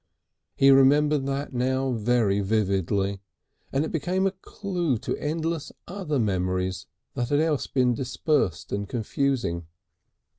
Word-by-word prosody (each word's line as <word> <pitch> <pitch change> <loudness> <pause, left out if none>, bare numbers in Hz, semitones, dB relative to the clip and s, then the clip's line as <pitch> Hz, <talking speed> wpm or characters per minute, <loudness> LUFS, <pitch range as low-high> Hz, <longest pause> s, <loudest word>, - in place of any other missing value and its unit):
He 135 0 +6
remembered 140 +1 +4
that 140 0 -3
now 130 +2 0
very 115 -3 +2
vividly, 100 -1 0 0.5
and 140 +3 +1
it - - -5
became 180 +4 0
a 195 - +2
clue 185 - -2
to - - -3
endless 160 0 -2 0.2
other 180 -6 -2
memories 95 -3 -1 0.3
that 120 -2 -2
had 145 - +3
else 155 -3 +1
been 125 -2 +2
dispersed 130 - -1
and 100 0 -3
confusing. 115 - -1
130 Hz, 125 wpm, -26 LUFS, 100-150 Hz, 0.5 s, He